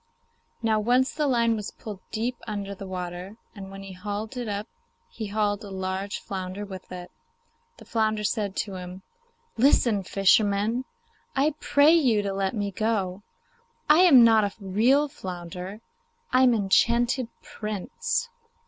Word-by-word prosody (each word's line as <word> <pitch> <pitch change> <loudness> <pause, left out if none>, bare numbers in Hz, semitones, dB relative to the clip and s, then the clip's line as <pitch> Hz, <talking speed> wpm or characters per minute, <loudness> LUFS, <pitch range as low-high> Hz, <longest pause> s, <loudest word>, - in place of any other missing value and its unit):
Now, 220 -1 +2
once 250 +4 +2
the 300 -2 0
line 235 -3 +2
was 210 -1 -4
pulled 210 -4 -9
deep 235 +3 -2
under 200 -2 -4
the 195 0 -8
water, 180 +2 -6 0.2
and 195 -2 -9
when 195 0 -9
he 195 -1 -9
hauled 205 +5 -5
it 245 -2 -4
up 205 +1 -3 0.4
he 220 -2 -5
hauled 205 0 0
a 205 - -8
large 190 +1 -3
flounder 190 +1 -5
with 190 -2 -10
it. 180 -1 -8 0.7
The - - -14
flounder 220 -2 0
said 205 -2 -1
to 195 -3 -3
him, 180 +1 -8 0.5
'Listen, 235 -4 +4
fisherman. 200 +5 +2 0.5
I 285 +3 +2
pray 290 +3 +5
you 245 -11 +3
to 200 -1 -2
let 195 +2 -1
me 205 -2 -2
go; 200 -3 -1 0.7
I 300 +2 +6
am 310 -10 +8
not 225 -2 +6
a 200 -1 -1
real 230 +9 +3
flounder, 180 - -7 0.5
I 255 - +5
am 250 -2 +5
an 210 - 0
enchanted 235 +5 +2 0.2
Prince. 470 - -3
210 Hz, 155 wpm, -26 LUFS, 195-235 Hz, 0.7 s, am